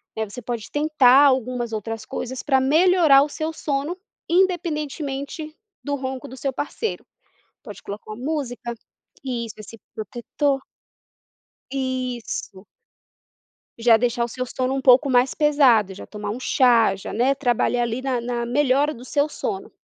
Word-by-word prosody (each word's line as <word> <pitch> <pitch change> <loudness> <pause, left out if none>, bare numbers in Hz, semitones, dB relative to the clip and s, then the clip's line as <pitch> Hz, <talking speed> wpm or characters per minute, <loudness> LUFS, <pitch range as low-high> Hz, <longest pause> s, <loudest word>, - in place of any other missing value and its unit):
né, 220 -2 -3
você 245 - -8
pode 235 -1 -5
tentar 290 -3 +5
algumas 250 -3 +1
outras 220 +1 -4
coisas 255 +3 -5
para 270 -3 +2
melhorar 315 0 +5
o 295 - -3
seu 315 +2 -3
sono, 300 +2 -3 0.3
independentemente 305 -4 -1 0.3
do 285 0 -1
ronco 260 -1 -5
do 260 - -10
seu 270 -1 -2
parceiro. 435 - -4 0.6
Pode 210 -6 -10
colocar 205 +1 -8
uma 240 +4 -8
música 245 -6 -3 0.5
isso, 235 -4 -4
esse 215 +1 -11 0.2
protetor 265 +5 -2 1.1
isso. 255 -7 -4 1.1
Já 230 -1 +6
deixar 235 +1 +1
o - - -6
seu 255 +2 -4
sono 255 +1 -2
um 270 - -1
pouco 260 +2 +6
mais 250 0 +3
pesado, 260 -10 +4
já 195 - -10
tomar 210 -1 -5
um 235 - -5
chá, 235 -6 +4
já, 190 - -8
né, 260 +5 +2
trabalhar 245 -2 +1
ali 235 +2 -2
na 260 -2 -1
na 235 0 -3
melhora 280 +3 +2
do 245 -3 -10
seu 285 +3 0
sono. 395 0 -5
260 Hz, 150 wpm, -23 LUFS, 235-285 Hz, 1.1 s, Já